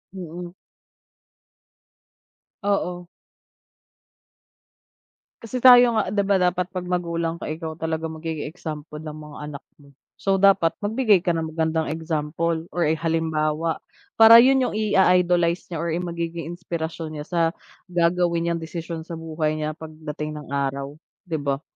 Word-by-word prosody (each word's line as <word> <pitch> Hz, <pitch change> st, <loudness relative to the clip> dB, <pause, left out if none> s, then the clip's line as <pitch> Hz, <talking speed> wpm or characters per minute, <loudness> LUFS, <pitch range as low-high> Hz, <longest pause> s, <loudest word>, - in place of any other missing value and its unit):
Mm. 175 Hz, -1 st, -7 dB, 2.1 s
Oo. 180 Hz, -3 st, -1 dB, 2.3 s
Kasi 240 Hz, +2 st, -5 dB
tayo 245 Hz, -1 st, +8 dB
nga, 215 Hz, -4 st, +1 dB
di 200 Hz, +1 st, +1 dB
ba, 200 Hz, 0 st, +3 dB
dapat 180 Hz, 0 st, +2 dB
pag 185 Hz, -, -2 dB
magulang 170 Hz, -2 st, -1 dB
ka, -, -, -7 dB
ikaw 160 Hz, 0 st, -5 dB
talaga 160 Hz, 0 st, -2 dB
magiging 160 Hz, -1 st, -5 dB
example 155 Hz, -2 st, -7 dB
ng 155 Hz, 0 st, -7 dB
mga 150 Hz, -1 st, -10 dB
anak 145 Hz, -2 st, -8 dB
mo? 140 Hz, -1 st, -19 dB, 0.2 s
So, 195 Hz, -1 st, +1 dB
dapat 195 Hz, -5 st, +5 dB
magbigay 215 Hz, -2 st, +3 dB
ka 180 Hz, -, -1 dB
ng 160 Hz, -2 st, -1 dB
magandang 160 Hz, -1 st, 0 dB
example 160 Hz, +1 st, -2 dB
or, 175 Hz, -, -1 dB
eh, 160 Hz, -, +1 dB
halimbawa. 160 Hz, -1 st, 0 dB, 0.4 s
Para 225 Hz, +1 st, +10 dB
yun 265 Hz, 0 st, +4 dB
yung -, -, -3 dB
i-a-idolize 180 Hz, -5 st, +2 dB
niya 170 Hz, -, -4 dB
or 170 Hz, 0 st, -2 dB
yung 175 Hz, +1 st, -2 dB
magiging 170 Hz, -1 st, -4 dB
inspirasyon 165 Hz, -2 st, -5 dB
niya -, -, -8 dB
sa, 175 Hz, -, 0 dB, 0.5 s
gagawin 170 Hz, -1 st, +1 dB
niyang 170 Hz, -, 0 dB
desisyon 165 Hz, 0 st, -6 dB
sa 170 Hz, -, -8 dB
buhay 160 Hz, -1 st, -2 dB
niya 155 Hz, 0 st, -3 dB
pagdating 155 Hz, -1 st, -6 dB
ng -, -, -13 dB
araw, 140 Hz, +1 st, -2 dB, 0.2 s
di 165 Hz, -3 st, -3 dB
ba? 140 Hz, -1 st, -2 dB
165 Hz, 140 wpm, -23 LUFS, 155-180 Hz, 2.3 s, Para